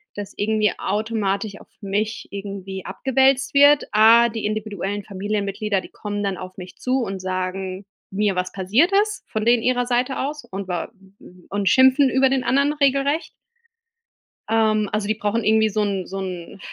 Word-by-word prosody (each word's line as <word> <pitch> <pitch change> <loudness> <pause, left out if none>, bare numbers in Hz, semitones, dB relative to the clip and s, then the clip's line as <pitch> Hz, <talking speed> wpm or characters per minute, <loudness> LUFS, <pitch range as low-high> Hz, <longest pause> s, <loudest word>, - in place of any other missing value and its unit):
dass 205 -1 -7
irgendwie 215 0 +1
automatisch 210 -1 -2
auf - - -17
mich 210 +2 -2
irgendwie 195 -1 -6
abgewälzt 265 +7 +1
wird. 285 +1 +6
A, 225 +2 +6
die 225 -1 -5
individuellen 205 -2 -3
Familienmitglieder 200 +1 -2
die - - -10
kommen 205 -1 -5
dann 195 -1 -1
auf 185 0 -9
mich 180 -1 -10
zu 255 +1 0
und 195 -3 -5
sagen 185 +1 -4 0.3
mir 200 0 0
was 180 0 -2
passiert 215 - +2
ist 425 -1 -7
von 220 0 -2
denen 235 0 +4
ihrer 245 +1 +1
Seite 250 +2 0
aus 290 +1 -3
und 195 -4 -7
wa 180 +3 -3 0.6
und 200 -1 0
schimpfen 265 +1 +5
über 265 +2 +3
den 265 -1 0
anderen 280 +3 +2
regelrecht. 280 +2 +1 1.2
Ähm, 215 -2 +2
also, 210 -1 -1
die 215 - 0
brauchen 220 +1 -1
irgendwie 220 0 +3
so 215 +1 -1
'n 195 -3 -2
so 195 +1 -5
'n, 185 -1 -6
210 Hz, 165 wpm, -22 LUFS, 195-245 Hz, 1.2 s, wird